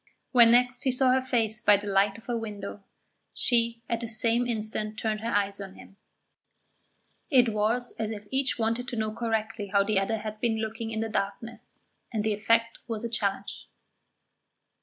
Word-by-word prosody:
When 240 -3 +7
next 245 +1 +4
he 260 - +2
saw 255 0 +4
her 260 +1 +3
face 225 -4 0
by 205 0 +6
the 205 - -8
light 200 0 +2
of 225 - -16
a 240 - -1
window, 205 -3 -6 0.5
she 230 -1 +1
at 235 - -1
the 230 -1 -5
same 230 +2 +2
instant 215 -1 -3
turned 215 -1 -1
her 225 +2 -3
eyes 200 -2 0
on 195 -1 -8
him; - - -15 1.3
it 250 -5 +5
was 225 +3 0
as 220 -1 -1
if 210 -2 -7
each 270 +1 +1
wanted 230 +2 -1
to 245 - -4
know 215 -1 -2
correctly 220 -2 -2
how 200 0 +3
the 200 -1 +1
other 210 +3 -1
had 215 0 -6
been 225 -1 0
looking 225 +1 -4
in 220 -1 -3
the 225 - -1
darkness, 205 +3 -5 0.3
and 220 -3 -1
the 215 0 +1
effect 230 +2 +1
was 225 -1 -3
a - - -2
challenge. 200 -3 -2
225 Hz, 185 wpm, -27 LUFS, 210-235 Hz, 1.3 s, When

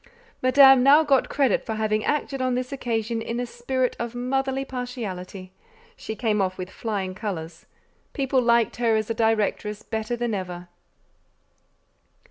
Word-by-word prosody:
Madame 270 0 +7
now 285 +4 +6
got 275 -4 +2
credit 270 -7 +1
for 220 - -4
having 215 0 0
acted 285 -2 -1
on 255 -1 +1
this 250 +1 -3
occasion 230 -3 -2
in 230 +1 -4
a 245 - -1
spirit 250 +2 -2
of 235 0 -4
motherly 270 +2 -1
partiality: 205 -8 -6 0.4
she 220 - -6
came 215 -2 0
off 185 -1 -1
with 185 +1 -6
flying 195 -4 -3
colours; 170 -5 -6 0.5
people 270 -2 +1
liked 235 -1 +2
her 230 -2 +2
as 220 +1 -1
a - - +1
directress 215 -2 0
better 220 +1 -3
than 240 -1 -2
ever. 180 -2 -5
235 Hz, 150 wpm, -24 LUFS, 210-255 Hz, 0.5 s, Madame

